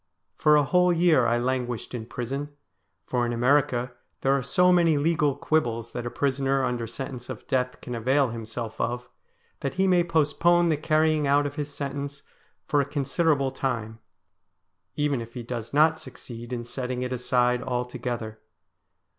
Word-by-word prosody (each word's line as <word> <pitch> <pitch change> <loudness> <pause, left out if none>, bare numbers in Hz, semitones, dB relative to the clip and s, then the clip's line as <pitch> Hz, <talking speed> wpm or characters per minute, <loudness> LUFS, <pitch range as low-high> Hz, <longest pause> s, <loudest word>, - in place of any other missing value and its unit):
For 150 0 +4
a 150 - +5
whole 180 +5 +3
year 165 -7 +4
I 120 +1 +2
languished 125 -1 -2
in 115 -2 -5
prison, 135 +5 -4 0.6
for 125 -1 0
in 120 - 0
America 125 0 +2 0.3
there 135 +1 +3
are 140 - 0
so 180 +7 +3
many 170 -3 +4
legal 150 -2 +2
quibbles 120 -7 -1
that 120 0 -4
a - - -2
prisoner 135 0 0
under 120 -2 -2
sentence 125 0 -6
of 125 -5 -7
death 125 -1 -1
can 125 - -6
avail 130 +3 +2
himself 115 0 -5
of, 125 +1 -2 0.5
that 140 - -3
he 190 +1 +2
may 180 -2 +4
postpone 170 +1 +3
the 155 - +3
carrying 155 0 +2
out 145 +1 +3
of 145 - -3
his 145 0 -4
sentence 140 0 -5 0.4
for 145 - +2
a - - -1
considerable 140 0 +1
time, 110 -5 -3 1.0
even 145 -4 0
if 115 +1 -10
he 120 - -5
does 115 -1 -5
not 155 +2 +4
succeed 120 -2 -10
in 120 -1 -3
setting 125 0 -3
it 125 0 -3
aside 125 0 +1
altogether. 125 -3 -4
130 Hz, 165 wpm, -26 LUFS, 120-150 Hz, 1.0 s, a